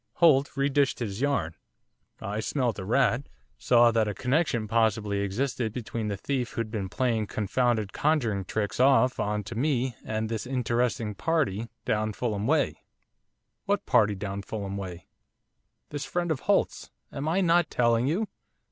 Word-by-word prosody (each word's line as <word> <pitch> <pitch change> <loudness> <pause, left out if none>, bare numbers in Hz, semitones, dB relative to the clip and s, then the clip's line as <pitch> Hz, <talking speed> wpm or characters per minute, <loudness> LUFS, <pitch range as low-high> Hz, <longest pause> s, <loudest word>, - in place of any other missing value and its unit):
Holt 145 -4 +4
re 140 0 +2
dished 140 -1 +2
his 105 -2 -4
yarn 120 - 0 0.7
I 105 +2 -4
smelt 120 -1 -1
a - - -4
rat 120 +5 +1 0.3
saw 120 -1 +5
that 110 -2 +2
a 105 - -3
connection 125 - 0
possibly 110 -2 +1
existed 110 +3 -1
between 115 -2 -4
the 100 -1 -2
thief 125 +3 -2
who'd 115 -2 -3
been 100 -4 -3
playing 115 0 0
confounded 110 0 0
conjuring 120 -11 +1
tricks 105 +4 -2
off 130 -1 +4
on 105 0 -1
to 110 - -7
me 130 -1 0
and 110 0 -2
this 115 +1 -4
interesting 120 -3 0
party 115 - 0 0.2
down 110 0 0
Fulham 105 -2 -2
way - - +1 0.4
' - - -53
'What - - 0
party 105 -1 +3
down 100 0 -4
Fulham 100 -1 -5
way?' 90 -3 -6 0.8
'This 145 -1 -4
friend 175 -1 -1
of 150 - -1
Holt's - - 0 0.2
am 140 +2 -4
I 175 +5 +2
not 175 -1 +3
telling 120 0 +2
you? 190 +9 0
115 Hz, 160 wpm, -27 LUFS, 105-135 Hz, 0.8 s, saw